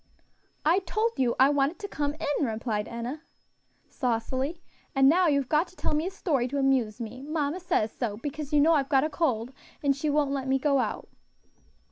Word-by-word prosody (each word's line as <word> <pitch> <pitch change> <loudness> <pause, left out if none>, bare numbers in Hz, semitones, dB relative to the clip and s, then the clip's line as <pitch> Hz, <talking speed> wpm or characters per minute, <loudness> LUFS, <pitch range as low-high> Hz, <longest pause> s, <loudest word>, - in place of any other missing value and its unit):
"I 335 +5 +4
told 430 +5 0
you 245 -3 +2
I 265 +1 +7
wanted 285 +3 +1
to 410 - -6
come 290 -5 -2
in," 290 -2 -1
replied 220 -1 -2
Enna, 240 +6 -5 0.7
saucily, 260 +5 -2 0.4
"and 270 0 +5
now 350 +5 +5
you've 280 -4 +2
got 310 +5 +2
to - - -19
tell - - -2
me 305 +3 0
a - - -1
story 290 -10 0
to 280 +3 -3
amuse 260 -5 +1
me; 235 +2 -6
mamma 300 +3 -2
says 340 - 0
so, 215 -5 -3
because 295 +3 -5
you 295 - +4
know 325 +3 +5
I've 275 -3 +1
got 270 -2 +4
a 310 - -1
cold, 260 -6 -1 0.3
and 280 -1 +3
she 295 +2 -2
won't 290 -1 +1
let 270 -1 -2
me 265 0 +3
go 275 0 +2
out." - - -2
280 Hz, 200 wpm, -27 LUFS, 255-310 Hz, 0.7 s, I